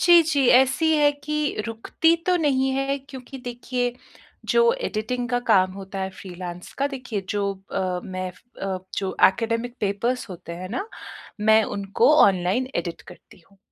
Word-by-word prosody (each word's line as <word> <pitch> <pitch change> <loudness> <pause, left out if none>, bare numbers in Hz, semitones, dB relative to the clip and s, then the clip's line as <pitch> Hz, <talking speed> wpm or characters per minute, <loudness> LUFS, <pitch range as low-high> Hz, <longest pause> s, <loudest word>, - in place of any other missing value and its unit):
जी, 345 -1 +7
जी, 290 -4 +1
ऐसी 315 +5 +2
है 295 -1 +5
कि 300 -6 -1
रुकती 230 +8 +1
तो 365 -1 +4
नहीं 270 -5 +2
है 275 +1 0
क्योंकि 265 0 -9
देखिए 245 0 -3 0.6
जो 470 0 +5
एडिटिंग 245 - -3
का 245 -1 +1
काम 185 -3 +4
होता 195 0 -7
है 190 0 -2
फ्रीलांस 180 -1 -8
का 280 - +2
देखिए 255 -6 -4
जो 205 -1 -1 0.3
अ, 185 -1 -1
मैं 185 -1 -4 0.3
अ, 190 -1 -2 0.2
जो 190 -2 -2
ऐकडेमिक 230 +4 -2
पेपर्स 215 +5 -1
होते 175 -1 -8
हैं 185 - -5
ना, 390 - -4 0.5
मैं 220 +1 +5
उनको 200 +9 +3
ऑनलाइन 190 +6 +2
एडिट 170 -2 -3
करती 175 - -15
हूँ। 195 - -25
235 Hz, 160 wpm, -24 LUFS, 195-270 Hz, 0.6 s, जी